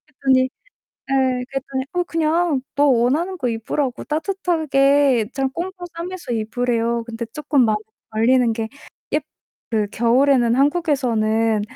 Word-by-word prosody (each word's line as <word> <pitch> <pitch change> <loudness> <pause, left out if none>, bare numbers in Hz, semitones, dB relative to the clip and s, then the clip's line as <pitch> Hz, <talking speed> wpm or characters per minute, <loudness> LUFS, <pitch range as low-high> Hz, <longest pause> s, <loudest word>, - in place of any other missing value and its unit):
그랬더니 265 -3 +2 0.6
예 260 -2 +1
그랬더니 270 -1 -3
어 355 0 +1
그냥 325 -3 +1
너 290 +1 +4
원하는 285 +9 +2
거 255 - -2
입으라고 240 +3 -2
따뜻하게 290 - +2
좀 270 -1 0
꽁꽁 360 +1 -5
싸매면서 345 -6 -5
입으래요. 230 +1 -1
근데 230 0 -5
쪼끔 290 -3 +2
마음에 215 -2 +2 0.3
걸리는 235 +2 +3
게 225 0 -3 0.5
예 300 - +3 0.5
그 215 -2 +1
겨울에는 240 0 +3
한국에서는 240 -8 +1
265 Hz, 295 characters per minute, -21 LUFS, 235-300 Hz, 0.6 s, 너